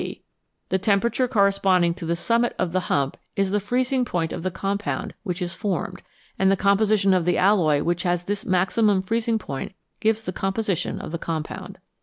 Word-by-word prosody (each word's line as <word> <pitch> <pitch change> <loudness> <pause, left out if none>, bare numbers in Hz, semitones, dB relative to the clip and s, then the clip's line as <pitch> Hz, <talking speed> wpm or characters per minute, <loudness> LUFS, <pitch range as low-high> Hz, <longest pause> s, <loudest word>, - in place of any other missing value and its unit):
The 190 - +1
temperature 230 +6 +2
corresponding 195 -6 +3
to 170 -2 -7
the 170 - +1
summit 230 +7 +1
of 180 -2 -1
the 185 - +1
hump 140 -1 0 0.2
is 195 -1 +1
the 205 - +2
freezing 250 +5 0
point 170 -8 -2
of - - -4
the 185 - -1
compound 200 +3 -3
which 185 -3 -3
is 175 +1 -3
formed, 195 -4 -3 0.4
and 190 0 +4
the 195 - +2
composition 200 0 +3
of 180 -2 +2
the 175 +1 +1
alloy 175 -7 +3
which 175 +1 0
has 175 -1 0
this 200 +2 -3
maximum 190 +2 +2
freezing 225 +3 0
point 140 -1 -6 0.2
gives 220 0 +1
the 185 - -4
composition 195 0 -1
of - - -7
the 170 - -3
compound. 160 -2 -5
195 Hz, 185 wpm, -24 LUFS, 175-215 Hz, 0.4 s, and